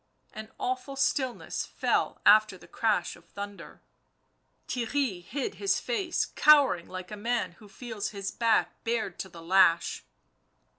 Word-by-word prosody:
An 215 0 -8
awful 255 +2 -3
stillness 265 -2 -1
fell - - -1
after 215 -2 +6
the - - -16
crash 220 -3 0
of - - -18
thunder; 200 0 -9 0.8
Theirry 245 -6 -1
hid 280 - -4
his 395 - +2
face, 400 -8 -1
cowering 285 - +5
like 185 0 -7
a - - -4
man 225 -2 -1
who 210 - -15
feels 225 -2 -5
his 200 -2 -5
back 220 -7 +1
bared 225 -5 -2
to 190 - -5
the 170 -2 -12
lash. 175 -1 +3
220 Hz, 140 wpm, -28 LUFS, 190-255 Hz, 0.8 s, after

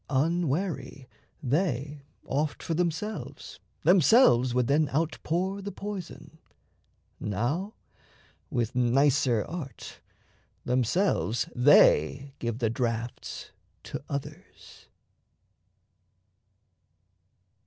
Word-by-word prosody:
Unwary, 160 -1 -1 0.4
they 145 0 -1 0.2
Oft 150 +2 -2
for 165 - -2
themselves 175 +5 -3 0.2
themselves 175 - +5
would 125 0 +1
then 145 +3 +2
outpour 170 +5 -1
The 200 +1 -5
poison; 195 -6 -8 0.8
now, 140 - -2 0.7
with 120 -4 -1
nicer 125 -1 +2
art, 160 -5 -8 0.7
themselves 125 - +1
They 135 - +4
give 115 -1 -3
the 115 -3 0
drafts 115 0 -4 0.3
to - - -6
others. 140 -1 -8
140 Hz, 75 wpm, -28 LUFS, 125-170 Hz, 0.8 s, themselves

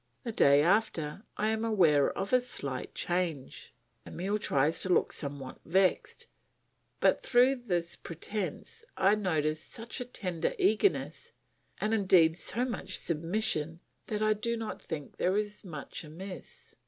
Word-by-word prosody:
The 230 - -3
day 140 -8 +5
after 180 -4 +1 0.2
I 215 - +1
am 220 0 -1
aware 170 -11 +4
of 195 +5 -3
a 250 - +6
slight 140 - -6
change. 175 -6 -2 0.4
Emile 200 +4 -2
tries 145 -4 +2
to 185 - -3
look 180 - +3
somewhat 140 -3 -6
vexed; 185 +3 +1 0.7
but - - +3
through 255 +2 +4
this 175 -8 -2
pretence 200 - -5
I 195 +2 +4
notice 155 -7 0
such 230 +7 -6
a - - -3
tender 180 -9 -2
eagerness, 400 - +1 0.5
and 215 +1 0
indeed 185 -6 +5
so 230 +7 0
much 245 - -2
submission, 165 -1 -1 0.3
that 215 0 -1
I 215 0 +4
do 235 +2 -2
not 225 -1 -5
think 150 -4 -6
there 185 +3 +1
is 210 0 -3
much 160 -6 -7
amiss. 180 +5 -10
185 Hz, 140 wpm, -30 LUFS, 160-215 Hz, 0.7 s, a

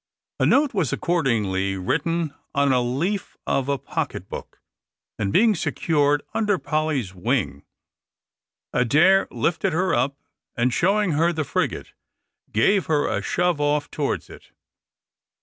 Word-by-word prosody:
A - - +3
note 285 -1 +3
was 180 - 0
accordingly 105 - 0
written 165 - -1 0.2
on 140 0 +3
the 125 -2 +3
leaf 165 +12 -2
of 135 0 0
a 140 - +1
pocket - - -4
book, - - -9 0.6
and 100 -2 -1
being 220 - +4
secured 145 -4 +1
under 210 -3 +1
Polly's 155 - -1
wing, 85 -5 -1 1.1
Adair 155 +11 +4
lifted 175 +2 -1
her 185 +3 +1
up, 135 +3 0 0.4
and 120 +1 +1
showing 200 +4 +2
her 165 +3 +2
the 160 -2 -2
frigate, - - -2 0.6
gave 180 - +2
her 150 -2 +1
a 100 - -1
shove 175 - 0
off 145 0 0
towards 145 -2 -2
it. - - -14
150 Hz, 130 wpm, -23 LUFS, 125-175 Hz, 1.1 s, being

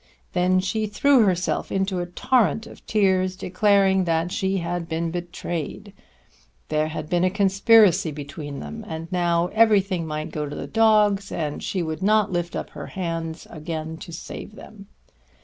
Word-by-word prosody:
Then 180 +1 +3
she 215 +3 -1
threw 255 +3 +4
herself 180 -1 -1
into 190 -1 0
a 175 - -3
torrent 225 +4 +1
of - - -13
tears 190 -3 +2
declaring 190 0 +2
that 165 +1 0
she 190 +1 0
had 170 -1 -3
been 165 +1 -2
betrayed. 175 +2 -5 0.8
There 155 0 +1
had 155 -1 -5
been 175 +2 +1
a 185 - +4
conspiracy 195 -1 +4
between 145 0 -7
them, 75 0 -7
and 160 +1 -6
now 175 -1 +1
everything 200 -6 +3
might 155 0 -4
go 150 -1 -3
to - - -6
the - - -5
dogs, 210 -3 +3
and 150 -3 -3
she 185 -3 -2
would 160 +1 -4
not 210 +1 +3
lift 175 -1 -2
up - - -5
her - - -8
hands 165 -3 -4
again 160 0 -5
to 170 - -10
save 175 +5 -8
them. 200 -3 -13
180 Hz, 165 wpm, -23 LUFS, 165-200 Hz, 0.8 s, threw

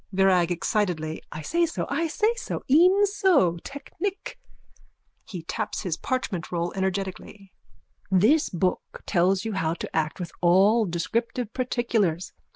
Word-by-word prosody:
VIRAG: 185 -2 +3
(Excitedly.) 175 -4 -1
I 155 - -7
say 340 - +1
so. 330 - -3
I 330 0 -1
say 430 +8 +1
so. - - -5
E'en 365 +8 +5
so. 360 - +2
Technic. 375 - -6 0.9
(He 180 -4 -7
taps - - -3
his 180 -5 -1
parchmentroll 175 - -3
energetically.) 190 +1 -4 0.6
This 215 - +4
book 180 +1 -2
tells 190 +2 +2
you 220 - -2
how 165 -4 -1
to - - -7
act 155 0 -1
with 175 -2 -5
all 195 +6 +4
descriptive 230 +7 -2
particulars. 225 -9 -1
195 Hz, 130 wpm, -25 LUFS, 175-255 Hz, 0.9 s, E'en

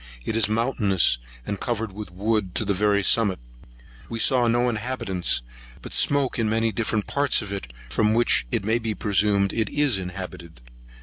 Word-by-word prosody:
It 110 - -2
is 110 -3 +2
mountainous, 105 - +2 0.3
and 100 - -4
covered 115 -3 -2
with 105 -1 -7
wood 100 +1 -1
to 110 - 0
the 100 - +1
very 100 +1 +2
summit. 100 -2 +4 0.7
We 115 - -4
saw 125 +1 +3
no 120 +1 +2
inhabitants, 110 - -1 0.4
but - - -8
smoke 140 -3 +2
in 110 -2 +1
many 115 +1 +1
different 110 -2 -1
parts 140 -4 +1
of 100 - -7
it, 95 -11 -5 0.2
from 105 - +1
which 65 - +2
it 90 - -1
may 110 +2 +1
be 110 -2 -3
presumed 100 -1 +1
it 110 -2 -1
is 145 -8 +1
inhabited. 90 -4 -8
105 Hz, 175 wpm, -24 LUFS, 95-115 Hz, 0.7 s, summit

